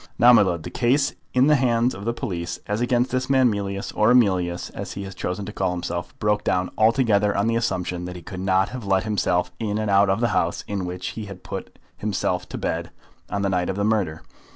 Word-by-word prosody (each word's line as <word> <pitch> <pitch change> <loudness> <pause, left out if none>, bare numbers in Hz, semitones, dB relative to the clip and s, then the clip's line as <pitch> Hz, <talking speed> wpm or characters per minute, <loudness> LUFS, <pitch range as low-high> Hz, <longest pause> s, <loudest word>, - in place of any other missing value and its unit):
Now, 120 +1 +7
my 115 - +7
lud, 85 -5 0
the - - -7
case 130 +3 +2 0.2
in 125 +1 +4
the 150 - +5
hands 120 -1 +2
of 100 +2 -8
the 115 - +1
police, 85 -6 -4
as 105 +2 -2
against 120 +1 +1
this 130 0 -1
man 130 -3 +4
Mealyus, 100 -1 -3
or 105 +1 +4
Emilius, 95 -8 +2
as - - -6
he 100 - -5
has 95 -1 -7
chosen 90 +2 -4
to 105 - -7
call 95 -3 0
himself, 90 - -4
broke 105 0 +1
down 90 0 0
altogether 110 -2 +3
on 100 - +2
the 115 - +1
presumption 90 -6 -1
that 90 0 -6
he 90 - -9
could 90 +3 -7
not 95 0 +2
have 125 -2 -7
let 95 -1 +2
himself 90 -4 0
in 105 -2 -1
and 110 -1 -1
out 100 0 +5
of 95 +2 +2
the 120 0 +2
house 85 -4 0
in 100 -3 -2
which 90 +1 -4
he 110 - -6
had 100 -2 -10
put - - -7 0.2
himself 95 -3 -2
to - - -5
bed - - -2 0.4
on 100 -1 -2
the 100 - +1
night 90 -2 0
of 95 - -1
the 100 - -1
murder. 100 -7 0
100 Hz, 240 wpm, -23 LUFS, 90-115 Hz, 0.4 s, Now